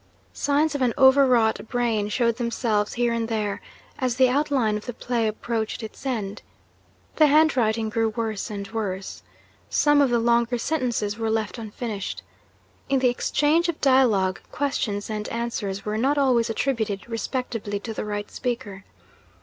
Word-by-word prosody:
Signs 290 +2 +1
of 285 - -3
an 245 -3 +1
overwrought 260 -5 +4
brain 230 -4 0
showed 235 +1 +1
themselves, 230 -3 0
here 240 -1 +1
and 230 -1 -1
there, 210 -3 -2 0.4
as 255 -3 0
the 260 0 +4
outline 265 -5 +1
of 210 - -6
the 245 - -5
play 235 -2 -1
approached 220 +1 -3
its 220 +5 -7
end. 210 -5 -3 0.8
The 310 - +6
handwriting 250 -8 +3
grew 225 +1 +1
worse 220 -2 -3
and 200 -2 -5
worse. 195 -4 -4 0.5
Some 295 -1 +4
of 275 - +3
the 240 - +2
longer 235 +1 +2
sentences 235 -6 -1
were 225 0 -1
left 220 +1 -1
unfinished. 215 -2 -5 0.7
In 275 - +3
the 255 -1 +3
exchange 300 +7 +1
of 330 - -3
dialogue, 225 -9 +3
questions 215 -8 -2
and 215 -1 -4
answers 210 -4 -3
were 210 +1 -1
not 275 +5 +2
always 250 -5 +3
attributed 220 -4 -1
respectively 230 -3 -3
to 225 +1 -5
the - - -4
right 205 -1 -4
speaker. 230 -6 -4
230 Hz, 155 wpm, -24 LUFS, 215-260 Hz, 0.8 s, The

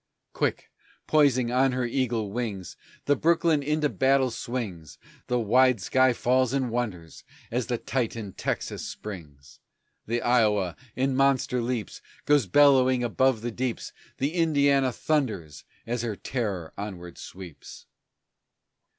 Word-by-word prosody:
Quick, - - -2 0.3
poising 130 -6 +3
on 130 +1 +3
her 125 -1 -1
eagle 115 -4 -1
wings, 105 -6 -4 0.3
The 145 - +3
Brooklyn 165 0 +2
into 150 +1 +1
battle 135 -2 +2
swings; 105 - -5 0.3
The 125 0 +1
wide 125 +2 +4
sea 130 +7 +3
falls 130 +1 +1
and 130 -3 0
wonders 100 -9 -4 0.3
as 125 +1 -1
the 120 - -1
titan 115 -6 -3
Texas - - -3
springs; 75 -9 -9 0.5
The 120 +2 -1
Iowa 105 -7 +2 0.2
in 130 +1 0
monster 135 -2 +2
leaps 115 -3 -4 0.2
Goes 145 -7 +3
bellowing 130 +1 +5
above 120 0 +1
the 120 +1 -3
deeps; 125 0 -4 0.2
The 140 +4 -1
Indiana 140 -6 +3
thunders 105 - -2 0.2
as 120 0 -2
her 115 -3 -3
terror 100 -9 -4
onward 90 -4 -7
sweeps. 90 -5 -11
125 Hz, 125 wpm, -26 LUFS, 105-135 Hz, 0.5 s, bellowing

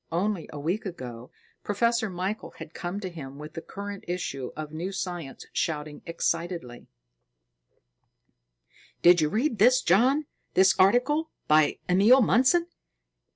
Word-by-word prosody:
Only 185 +1 -1
a 150 - -7
week 180 +8 -2
ago, 125 -8 -8 0.3
Professor 230 +2 +1
Michael 185 +4 -4
had - - -10
come 180 +2 -4
to 190 - -4
him 140 -5 -9
with 150 +1 -9
the 165 - -6
current 200 +1 -7
issue 140 -7 -4
of 155 -1 -6
New 170 +5 -4
Science, 175 -7 -5
shouting 150 -2 -3
excitedly: 165 -6 -3 2.2
"Did 175 -1 +7
you 155 - +2
read 230 - 0
this, 250 +5 +6
John, 255 - +3 0.3
this 190 0 +6
article 255 +11 +3 0.2
by 155 -1 +4
Emil 205 +9 +6
Mundson?" 260 +11 +3
180 Hz, 130 wpm, -27 LUFS, 155-215 Hz, 2.2 s, Did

